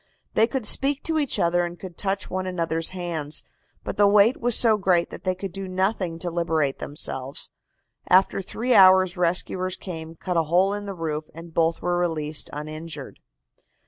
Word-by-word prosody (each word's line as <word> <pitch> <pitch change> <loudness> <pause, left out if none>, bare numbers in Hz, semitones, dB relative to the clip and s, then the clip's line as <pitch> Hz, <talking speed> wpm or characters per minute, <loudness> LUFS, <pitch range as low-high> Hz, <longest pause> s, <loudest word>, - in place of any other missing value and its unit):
They 220 - +4
could 260 -3 -3
speak 275 +6 +3
to 320 -1 0
each 285 -3 0
other 175 +1 +2
and 175 0 -6
could 185 -3 -9
touch 195 +1 -2
one 185 0 -3
another's 165 -2 -2
hands, 170 -5 -4 0.4
but - - -5
the 205 - +5
weight 210 +4 +4
was 240 -1 +4
so 225 -2 +6
great 185 -4 +1
that - - -10
they 185 0 +1
could 190 0 -6
do 195 +1 -6
nothing 185 -2 -1
to 175 +1 -4
liberate 160 -5 0
themselves. 135 -2 -3 0.6
After 190 +1 +4
three 240 +6 -1
hours 185 -2 +6
rescuers 180 +1 -1
came, 165 -3 -8
cut 180 +1 -3
a 165 - +3
hole 180 +5 +2
in 205 0 -5
the 195 - -5
roof 155 -2 -3
and 165 0 -11
both 165 0 +1
were 175 0 0
released 155 -3 -1
uninjured. 155 0 -7
180 Hz, 180 wpm, -24 LUFS, 165-195 Hz, 0.6 s, so